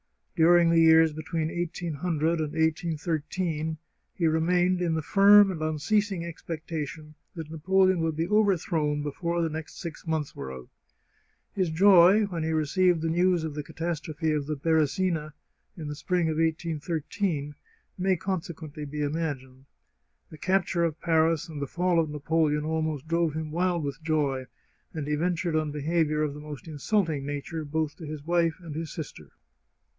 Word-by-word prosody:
During 170 0 +5
the 165 - +4
years 160 -1 +6
between 155 +1 -3
1800 165 -1 -1
and 155 -1 -3
1813 160 0 -1 0.4
he 175 - 0
remained 175 +3 +2
in 170 -2 +1
the 160 - -2
firm 200 +3 +6
and 165 -4 -6
unceasing 170 +4 0
expectation 155 -2 -6 0.2
that 160 -2 -7
Na 160 - -6
poleon 190 +2 +3
would 165 -1 0
be 165 +2 -1
overthrown 170 -8 +1
before 170 +4 -2
the 165 - 0
next 155 0 -7
six 170 0 -8
months 155 -3 -2
were 65 -1 -6
out. 65 -1 -10 0.8
His 185 -3 0
joy 190 +4 +6
when 175 -5 -4
he 160 - -1
received 160 +2 +2
the 165 - 0
news 175 0 +2
of 160 -2 -4
the 150 - -4
catas 160 +1 -4
trophe 155 +1 -2
of 150 -2 -1
the 155 - -1
Beresina, 160 +1 0 0.4
in 155 -3 -6
the 150 - -4
spring 175 +2 0
of 155 - -2
1813, 160 0 -2 0.5
may 185 0 +2
conse 185 -1 -3
quently 150 -2 -8
be 150 +1 -4
imagined. 140 -4 -3 0.7
The 155 - -11
capture 185 -2 +1
of 165 -1 -1
Paris 165 -1 +2
and 155 -3 -7
the 140 - -2
fall 175 +3 +1
of 160 -2 +1
Napoleon 150 0 0
almost 155 -2 -2
drove 165 -2 +1
him 160 -1 -4
wild 175 0 0
with 140 +2 -4
joy, 145 -5 0 0.5
and 155 -3 -3
he 150 - 0
ven 175 +4 +1
tured 165 -2 0
on 155 - -4
behaviour 155 +1 0
of 150 -2 -1
the 150 - -9
most 150 +3 -9
insulting 160 0 0
nature, 145 +3 -4
both 155 0 -2
to 160 - -8
his 150 -1 -7
wife 170 -1 +2
and 165 -3 -8
his 160 +1 -5
sister. 135 - -8
160 Hz, 170 wpm, -27 LUFS, 150-170 Hz, 0.8 s, years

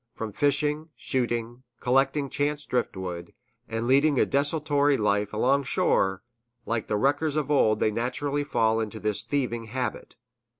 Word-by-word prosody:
From 110 -1 -5
fishing, 150 +5 0
shooting, 120 -2 -2 0.2
collecting 135 +3 +1
chance 145 +2 -1
driftwood, 90 -8 -3 0.3
and 115 0 -2
leading 140 +3 +3
a - - +4
desultory 145 0 +2
life 105 -1 0
along 130 +6 +2
shore, 95 -4 +1 0.4
like 115 -1 -2
the 105 - 0
wreckers 145 +5 +1
of 150 -1 -1
old 110 -7 +3
they 110 - +2
naturally 140 +6 -2
fall 110 -6 +1
into 110 0 -4
this 105 -2 -1
thieving 120 -1 -2
habit. 125 +3 -4
125 Hz, 140 wpm, -26 LUFS, 110-145 Hz, 0.4 s, a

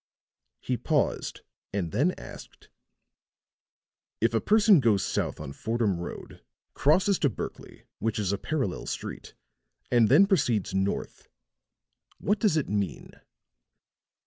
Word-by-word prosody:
He - - -1
paused - - -1 0.3
and 95 -5 -2
then 150 - +2
asked: - - -12 1.5
"If - - +2
a - - +2
person 210 -4 +5
goes 110 -7 +2
south - - -2
on 70 -3 -7
Fordham 110 -4 -1
Road, 85 - -8 0.3
crosses 185 +7 +3
to 145 - +3
Berkley, 110 - -8 0.2
which 110 -1 -1
is 100 -3 0
a 100 - -2
parallel 135 - -2
street, - - -6 0.6
and 120 -3 +4
then 155 +10 +7
proceeds 125 - +1
north, 95 +1 -2 0.9
what 205 +1 0
does 200 -7 +2
it 150 - 0
mean?" 100 -2 -3
120 Hz, 120 wpm, -27 LUFS, -, 1.5 s, then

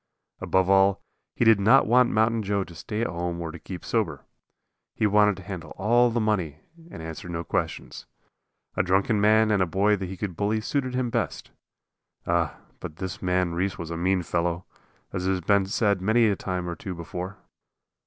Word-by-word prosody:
Above 95 -1 +1
all, 95 0 +4 0.3
he 120 - +1
did 110 -2 +6
not 115 +7 +5
want 125 +2 +4
Mountain 110 +1 +2
Joe 100 -1 0
to 85 - -13
stay 105 +6 -5
at - - +1
home 85 0 -3
or 85 -1 -4
keep 90 +2 -9
sober. - - -1 0.7
He 110 - +1
wanted 105 -1 +4
to 95 - -10
handle 90 -4 -8
all 120 +5 +3
the 120 +1 -1
money 90 -9 -1 0.3
and 80 - -9
answer 80 +3 -7
no 85 -1 -3
questions. - - -4 0.7
A - - +2
drunken 95 +4 +1
man 110 +1 +4
and 100 -2 +2
a 90 - +2
boy 100 +5 +2
that 95 -2 -5
he 95 - -7
could 95 -4 -4
bully 105 +4 0
suited 130 +3 -2
him 125 -2 -1
best. - - -3 0.7
Ah, 85 -2 0 0.2
but 75 - -7
this 95 +2 -6
man 90 -1 0
Reese 95 +2 -1
was 85 -1 -6
a - - -3
mean 90 +2 +1
fellow, 85 +1 -1 0.5
as 95 -1 -2
has 95 -1 +1
been 100 +2 +2
said 100 -2 +1
a 110 +1 +3
time 90 -2 -4
or 85 - -3
two 95 0 -6
before. 90 +3 -6
95 Hz, 190 wpm, -25 LUFS, 90-105 Hz, 0.7 s, did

